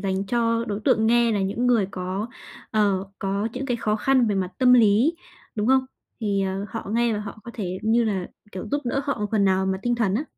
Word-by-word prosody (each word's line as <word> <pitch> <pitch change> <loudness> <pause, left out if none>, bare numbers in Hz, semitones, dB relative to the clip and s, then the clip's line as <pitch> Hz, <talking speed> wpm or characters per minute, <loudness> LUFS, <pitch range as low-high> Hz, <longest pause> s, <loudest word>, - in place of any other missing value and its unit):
dành 195 0 -2
cho 230 +1 +1
đối 205 -2 -4
tượng 220 - +3
nghe 235 0 +4
là 205 - 0
những 210 +6 -1
người 235 -5 +3
có, 185 +3 -3 0.4
ờ, 200 -3 +1
có 200 +2 -1
những 260 +2 -4
cái 245 -3 0
khó 215 -2 0
khăn 260 +2 +3
về 210 - +1
mặt 185 -2 -1
tâm 255 -1 +5
lý, 235 +6 +5 0.4
đúng 210 -1 -1
không? 265 +1 +4 0.4
Thì, 200 -3 0
ờ, 190 +1 -2
họ 225 +2 -6
nghe 235 +1 +2
và 210 - -2
họ 210 0 -8
có 235 - -7
thể, 185 -4 -4
như 225 +2 +3
là 195 -5 -1 0.3
kiểu, 185 - -6
giúp 285 +1 0
đỡ 250 +3 0
họ 280 -4 -2
một 210 - 0
phần 210 -3 +2
nào 190 0 +2
mà 190 0 0
tinh 240 +1 +1
thần 220 -5 0
á. 260 +8 0
215 Hz, 245 wpm, -24 LUFS, 195-240 Hz, 0.4 s, tâm